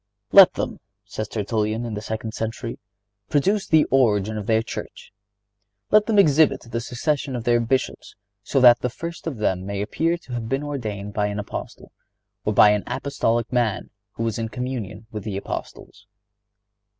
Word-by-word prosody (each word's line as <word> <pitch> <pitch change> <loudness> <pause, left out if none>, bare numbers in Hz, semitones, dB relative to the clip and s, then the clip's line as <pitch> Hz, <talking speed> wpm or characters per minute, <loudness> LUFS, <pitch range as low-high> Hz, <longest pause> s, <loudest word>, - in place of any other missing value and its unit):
"Let 195 -2 +9
them," - - -3 0.3
says 110 +2 -5
Tertullian, 110 +1 -2
in 115 - -4
the 105 - -4
second 110 0 -4
century, 115 +1 -4 0.5
"produce 195 +8 +1
the 160 -2 +5
origin 110 -5 +2
of 105 -2 -5
their 110 0 +3
church. - - -8 0.8
Let 210 0 +5
them 220 -2 +1
exhibit 150 -6 +5
the 115 0 -4
succession 135 +3 -2
of 120 - -4
their 120 0 +3
Bishops, 125 +3 -2 0.3
so - - 0
that 120 -1 +8
the 125 - -1
first 170 +7 -7
of 145 -7 -3
them 95 -4 0
may 100 +1 -4
appear 165 +12 0
to 135 -7 -11
have 115 -2 -4
been 135 +2 -1
ordained 105 -8 -5
by 105 0 0
an 105 0 -4
Apostle, 105 0 -7 0.5
or - - 0
by 105 - +7
an 105 -1 0
apostolic 120 -4 -1
man 120 -4 0 0.2
who 115 - -4
was 115 0 -2
in 115 -1 -3
communion 115 -4 -5
with 105 -2 -6
the 100 -2 -4
Apostles." 100 +1 -7
115 Hz, 175 wpm, -23 LUFS, 105-135 Hz, 0.8 s, Let